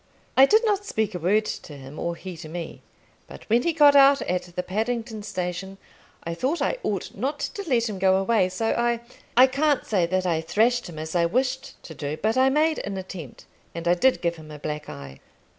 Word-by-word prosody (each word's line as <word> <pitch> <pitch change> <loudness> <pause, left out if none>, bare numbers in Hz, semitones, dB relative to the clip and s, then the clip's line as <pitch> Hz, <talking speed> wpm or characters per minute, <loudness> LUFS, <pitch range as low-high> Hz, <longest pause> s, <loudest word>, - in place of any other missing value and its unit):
I 270 +1 +8
did 440 - +4
not 410 -2 +1
speak 220 - -2
a 180 - -4
word 205 +6 +2
to 145 -7 -6
him, 135 +2 -10
or 170 0 -2
he 185 +1 -8
to 155 -1 -9
me; 170 0 -7 0.5
but - - -12
when 235 +2 +5
he 340 - +1
got 295 -3 +6
out 275 0 +6
at 180 0 -1
the 180 - -2
Paddington 220 +3 -3
Station, 185 0 -4 0.5
I 170 - -4
thought 265 - -1
I - - -1
ought 195 -4 -3
not 275 +7 -2
to 390 +5 -5
let 235 -3 +2
him 205 -3 -5
go 190 0 +4
away, 195 -1 +2
so 225 +5 -2
I 235 0 0 0.4
I 255 - +9
can't 280 +2 +1
say 185 -6 +1
that 185 +1 0
I 165 -3 +1
thrashed 225 +7 +1
him 160 - -10
as 155 +2 -5
I 170 -1 +3
wished 260 +6 -1
to 165 - -9
do; 150 0 -4
but 220 +5 0
I 260 +1 +4
made 310 +3 +2
an 200 -1 -5
attempt, 185 -8 -8 0.3
and 170 0 -4
I 175 - +5
did 255 +9 +2
give 170 0 0
him 155 -1 -12
a 150 - -8
black 150 0 -5
eye. 70 -1 -9
200 Hz, 225 wpm, -25 LUFS, 170-260 Hz, 0.5 s, I